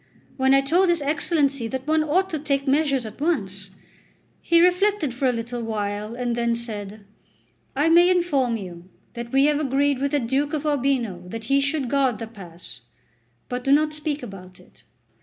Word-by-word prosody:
When 265 0 +3
I 275 - +5
told 345 +7 +2
his 340 -4 +1
Excellency 280 -4 0
that 260 +2 -5
one 310 0 +2
ought 355 +6 +1
to 315 - -2
take 275 -1 -1
measures 275 -3 +1
at 220 +5 -10
once, 200 - -1 0.7
he 335 0 +3
reflected 360 - +2
for 260 +2 0
a - - +3
little 240 +1 -4
while 210 0 -3
and 245 -1 -2
then 235 0 0
said: 215 -3 -6 0.7
"I 290 +4 +2
may 345 +2 +6
inform 290 -10 +1
you 180 -3 -10 0.2
that 235 -1 -7
we 270 +1 +4
have 295 0 +2
agreed 280 -1 +1
with 280 +1 0
the 290 - +3
Duke 270 +5 -1
of 305 -1 -2
Urbino 260 -10 0
that 225 +4 -7
he 275 - +4
should 285 -1 -1
guard 265 -3 +1
the 225 - -5
pass; 180 - -12 0.7
but 245 0 -4
do 270 - +1
not 305 +2 +3
speak 300 -2 -4
about 185 -5 -10
it." - - -21
270 Hz, 185 wpm, -23 LUFS, 230-300 Hz, 0.7 s, may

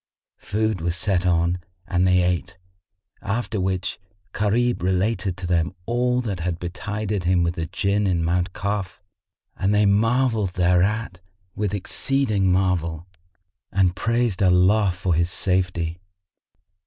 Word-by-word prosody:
Food 110 -3 -1
was 85 +1 -1
set 90 -2 +1
on 85 +1 +2 0.3
and 90 0 +2
they 90 -1 +4
ate, 90 +1 -1 0.6
after 110 0 -2
which 95 +1 -2 0.3
Gharib 115 +3 +1
related 95 +1 0
to 90 - -6
them 85 0 0
all 125 +1 +1
that 100 -7 -4
had 85 0 -2
betided 100 +2 -4
him 90 0 +3
with 85 0 0
the 80 -1 -4
Jinn 100 +3 0
in 85 -3 +1
Mount 90 +2 0
Kaf, 100 -1 -3 0.6
and 100 +2 +1
they 105 0 +4
marvelled 110 -1 +2
thereat 90 +3 +1 0.3
with 105 -1 -2
exceeding 105 -1 0
marvel 85 -3 0 0.7
and 95 -2 +2
praised 115 -1 0
Allah 95 +2 +4
for 90 0 -1
his 85 +2 +1
safety. 85 0 -1
95 Hz, 130 wpm, -23 LUFS, 90-105 Hz, 0.7 s, they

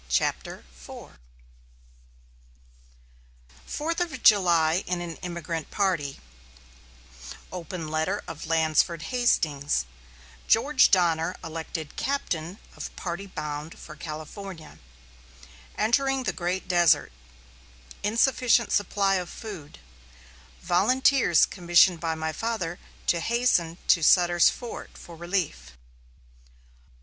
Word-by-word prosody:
] - - -25
CHAPTER 65 - -1 0.2
IV 60 - -12 2.5
FOURTH 330 +3 -2
OF 315 -8 -4
JULY 170 -6 +5
IN 180 -1 -1
AN 170 -2 -6
EMIGRANT 170 -3 -5
PARTY 175 -9 -1 1.3
OPEN 175 -2 -6
LETTER 160 +6 -1
OF 165 -1 -7
LANSFORD 160 0 +1
HASTINGS 150 - +1 0.6
GEORGE 260 +4 +4
DONNER 175 -2 +2
ELECTED 160 -1 -6
CAPTAIN 185 - -2 0.2
OF - - -8
PARTY 180 +2 -5
BOUND 150 -3 -6
FOR 155 - -11
CALIFORNIA 155 +2 -8 1.0
ENTERING 270 +4 +1
THE - - -1
GREAT 180 +2 -3
DESERT 170 - +3 0.9
INSUFFICIENT 235 +1 +2
SUPPLY 200 -1 +1
OF 180 - -6
FOOD 185 -10 -9 0.9
VOLUNTEERS 250 - +4
COMMISSIONED 175 -1 +3
BY 165 -1 -2
MY 160 0 -3
FATHER 185 -4 -3 0.3
TO 170 - +2
HASTEN 175 -6 +1
TO 170 - +5
SUTTER'S 175 +2 +5
FORT 240 -2 -8
FOR 170 - -12
RELIEF. 165 - -3
175 Hz, 100 wpm, -26 LUFS, 160-205 Hz, 2.5 s, JULY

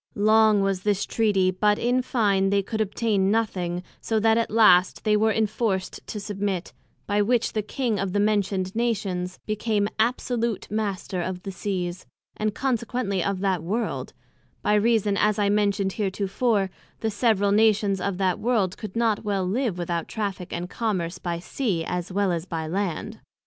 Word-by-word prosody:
Long 215 0 +4
was 195 -1 0
this 205 -1 0
Treaty, 200 -5 +2
but 210 +3 +2
in 250 +2 +1
fine, 200 -6 +1
they 200 0 +2
could 220 +3 -3
obtain 205 -2 +1
nothing, 180 -5 -1 0.2
so 220 -1 0
that 220 +1 +4
at 230 0 +1
last 200 -5 +5
they 210 -1 +3
were 220 +1 +3
inforced 215 -3 -1
to 210 - -5
submit; 200 -3 -3 0.3
by 205 0 +1
which 235 +3 +1
the 215 - 0
King 220 0 -2
of 195 -1 -1
the 205 - 0
mentioned 200 -2 +1
Nations 195 -6 -1
became 215 -1 0
absolute 235 -1 0
Master 200 -4 -2
of 180 +1 -4
the 195 - -5
Seas, 185 -2 -4 0.3
and 215 -1 -1
consequently 235 -6 -1
of 195 0 -1
that 190 -4 +1
World; 210 +8 -3 0.5
by - - +2
reason, 210 -1 +2
as 210 0 +2
I 205 -1 +2
mentioned 200 -1 +1
heretofore, 200 0 0 0.3
the 220 - 0
several 205 -2 +2
Nations 205 -2 +3
of 200 -2 -2
that 185 -2 +1
World 215 -6 +1
could 215 -2 -7
not 225 -2 +1
well 200 -3 0
live 215 0 -1
without 170 -1 -2
Traffick 200 -5 -4
and 175 +1 -3
Commerce, 185 -5 -2
by 170 -1 -3
Sea, 180 -2 -2
as 180 +1 -3
well 200 0 +1
as 170 +1 -3
by 165 -3 -3
Land. 175 0 -3
205 Hz, 170 wpm, -25 LUFS, 185-220 Hz, 0.5 s, last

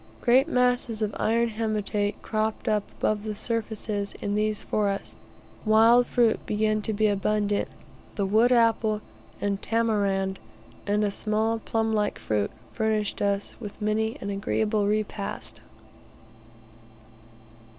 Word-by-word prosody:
Great 260 +4 +4
masses 245 -5 +1
of 215 - -1
iron 230 +2 +2
haematite 210 -2 -1
cropped 215 0 -2
up 210 -1 +2
above 215 -1 0
the 215 -1 -4
surfaces 215 -2 -2
in 205 - -2
these 215 0 0
forests. 200 -2 -2 0.4
Wild 225 +3 +5
fruit 235 -2 +2
began 215 0 +1
to 220 - -1
be 215 +1 +1
abundant; 205 0 +1 0.5
the 200 - 0
wood 220 +5 +4
apple 225 -3 +3 0.4
and 200 -1 -1
tamarind 200 -4 0 0.5
and 205 +1 +2
a 205 - +1
small 220 +2 0
plum 225 0 -1
like 210 -1 0
fruit, 105 -2 -1 0.2
furnished 220 -2 -1
us 200 0 0
with 210 -3 -8
many 220 +1 0
an 200 - -3
agreeable 210 +1 0
repast. 210 -1 -3
215 Hz, 125 wpm, -26 LUFS, 205-225 Hz, 0.5 s, Wild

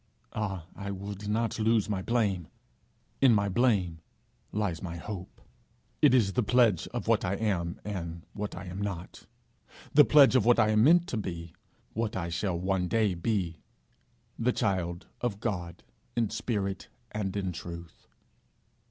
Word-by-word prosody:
Ah, 95 -6 -3
I 100 0 -6
would 100 +1 -6
not 115 +2 0
lose 110 -1 +3
my 100 -3 -1
blame! 100 -7 0 0.7
in 130 -4 +7
my 100 -1 +2
blame 95 -7 +1 0.5
lies 100 -6 -1
my 85 -2 -5
hope. 95 +1 -7 0.6
It 130 - +6
is 100 -6 +3
the 125 - +2
pledge 115 -5 +3
of - - -5
what - - +3
I 95 +1 0
am, 95 -5 -1
and 85 -5 -5
what 105 0 -4
I 90 - -7
am 90 +2 -6
not; 95 -4 -5 0.7
the 150 - +9
pledge 140 -3 +6
of 130 - +5
what 120 +2 +5
I 110 -2 +4
am 110 0 +4
meant 170 +5 +6
to 120 - -2
be, 85 -5 -5 0.4
what 110 -1 -2
I 85 -2 -2
shall 85 +2 -1
one 95 0 0
day 110 -1 +2
be, 85 -3 -1 0.8
the 120 +2 +3
child 95 -6 -1 0.2
of 115 -5 -1
God 90 -7 -4 0.3
in 115 -3 +1
spirit 100 -5 -2 0.2
and 105 -2 -2
in 95 -2 -1
truth.' 85 0 -9
100 Hz, 160 wpm, -29 LUFS, 90-110 Hz, 0.8 s, the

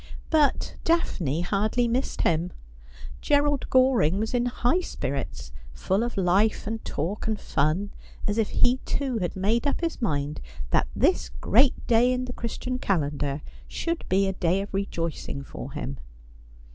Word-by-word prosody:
But 305 -3 +2
Daphne 175 - +1
hardly 215 +6 +1
missed 250 +3 -1
him. 170 +2 +1 0.7
Gerald 290 -1 +2
Goring 255 - +4
was 220 +3 -2
in 245 0 +2
high 245 +7 +1
spirits, 130 - -4 0.2
full 190 - 0
of 240 -2 -2
life 195 +4 +2
and 220 +1 -4
talk 180 +10 -3
and 215 -2 -1
fun, 160 +8 0 0.3
as 205 +2 0
if 220 - +1
he 245 +1 +3
too 260 -2 -2
had 175 -3 -2
made 220 +8 +1
up 285 - 0
his 330 -5 -2
mind 145 -7 -1 0.3
that - - +3
this 60 - +2
great 220 - +2
day 240 +2 +4
in 255 0 -1
the 245 - -6
Christian 250 +2 -4
calendar 145 - -1 0.2
should 335 0 -3
be 195 +1 +3
a 195 - 0
day 180 +1 +1
of 200 - -7
rejoicing 165 -7 -3
for 135 0 -8
him. 140 -3 -5
205 Hz, 155 wpm, -26 LUFS, 160-245 Hz, 0.7 s, Goring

